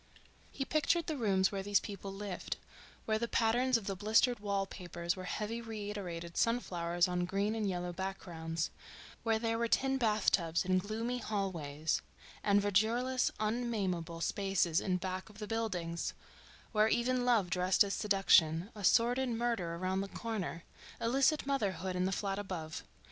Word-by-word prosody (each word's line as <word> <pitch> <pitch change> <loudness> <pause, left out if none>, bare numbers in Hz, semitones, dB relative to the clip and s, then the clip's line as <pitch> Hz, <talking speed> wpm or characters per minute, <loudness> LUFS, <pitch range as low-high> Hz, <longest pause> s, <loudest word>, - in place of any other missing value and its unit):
He 270 - -3
pictured 310 +3 +2
the 315 - -2
rooms 195 -7 +2
where 195 -1 -2
these 200 +1 +3
people 200 -1 -7
lived—where 205 +2 -5
the 235 - -1
patterns 240 +3 +3
of 220 - -7
the 195 - -2
blistered 220 +4 +3
wall 200 -1 0
papers 175 -2 -4
were 185 -1 -7
heavy 215 +5 -3
reiterated 205 -6 -5
sunflowers 175 -7 +1
on 180 0 0
green 200 +3 0
and 215 -3 -1
yellow 180 -1 -3
backgrounds, 170 -4 -3 0.5
where 225 -1 +2
there 225 0 -1
were 235 - +1
tin 270 +3 +2
bathtubs 200 -8 +2
and 185 0 +3
gloomy 225 +5 -2
hallways 165 -9 -2 0.4
and 205 0 +4
verdureless, 235 +6 +2
unnamable 205 -7 -1
spaces 195 -3 +1
in 185 -1 +1
back 185 +2 -4
of 210 - -15
the 210 - -5
buildings; 185 -7 -2 0.6
where 215 -1 +4
even 245 +2 +1
love 225 -8 +3
dressed 180 +2 +4
as 200 -1 -2
seduction—a 195 0 +3
sordid 245 +6 +4
murder 230 -8 -1
around 185 +2 -1
the 195 - -3
corner, 195 -6 -4 0.4
illicit 270 +6 +2
motherhood 190 -10 -1
in 180 0 +1
the 190 - 0
flat 195 0 -1
above. 170 -6 -5
200 Hz, 150 wpm, -34 LUFS, 180-230 Hz, 0.6 s, and